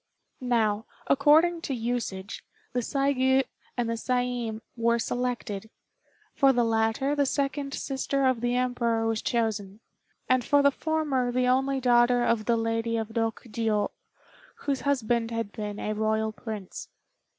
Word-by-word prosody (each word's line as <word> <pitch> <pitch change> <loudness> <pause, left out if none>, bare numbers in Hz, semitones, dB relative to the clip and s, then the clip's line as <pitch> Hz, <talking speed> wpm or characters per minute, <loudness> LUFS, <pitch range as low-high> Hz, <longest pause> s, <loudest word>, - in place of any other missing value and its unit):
Now, 220 -3 +1 0.2
according 325 +5 +4
to 285 -6 -3
usage, 225 -5 -3 0.3
the 250 - +1
Saigû 270 0 +2 0.3
and 240 -1 0
Saiin 240 -1 -1
were 235 0 +2
selected; 235 -4 -3 0.6
for 275 -1 +5
the 245 -2 +2
latter 225 +5 +1
the 285 -1 +2
second 275 0 -1
sister 275 0 -1
of 255 -3 +2
the 245 0 0
Emperor 235 -2 0
was 225 -1 0
chosen, 215 -4 -1 0.5
and 255 -1 +3
for 285 +2 +3
the 280 - +6
former 285 -5 0
the 250 +1 +1
only 265 +2 +2
daughter 245 -1 +4
of 230 -2 +1
the 235 0 +2
Lady 225 0 -1
of 220 -1 -3
Rokjiô, 225 -1 -1 0.6
whose 275 -2 -2
husband 240 -4 0
had 230 -3 -3
been 210 -1 -5
a 215 - -2
Royal 220 0 0
Prince. 215 -4 -7
240 Hz, 140 wpm, -27 LUFS, 225-265 Hz, 0.6 s, the